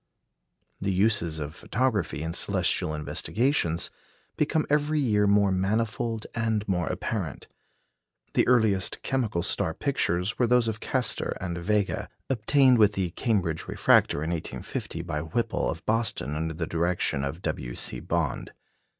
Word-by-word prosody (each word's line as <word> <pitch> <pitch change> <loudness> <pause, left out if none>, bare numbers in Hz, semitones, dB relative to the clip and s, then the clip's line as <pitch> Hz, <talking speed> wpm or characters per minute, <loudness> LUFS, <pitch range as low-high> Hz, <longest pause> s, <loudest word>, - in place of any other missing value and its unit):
The 100 0 0
uses 95 -5 +2
of 75 0 -5
photography 105 - -1
in 80 +1 -3
celestial 90 -3 0
investigations 85 - 0 0.4
become 155 +1 +1
every 150 +1 +1
year 105 -7 +2
more 100 -1 +4
manifold 110 +4 -1
and 110 -2 -1
more 90 -4 0
apparent. - - -3 0.9
The - - +3
earliest 110 -6 +2
chemical 115 -10 0
star 80 - +2
pictures 105 -7 0
were 120 - +4
those 125 -1 +3
of 110 -1 -2
Castor 125 -1 0
and 90 -2 -3
Vega, 100 +2 0 0.2
obtained 130 +1 +4
with 105 -1 +5
the 95 -3 -1
Cambridge 90 -8 -1
refractor 75 - +3
in 80 - -2
1850 85 0 -4
by 80 -3 -3
Whipple 85 +9 -1
of 80 +1 -5
Boston 110 -9 0
under 80 +1 -2
the 80 0 -2
direction 85 -4 0
of 75 +6 -4
W. 65 -6 -3
C. - - -2
Bond. - - -2
100 Hz, 140 wpm, -27 LUFS, 85-115 Hz, 0.9 s, with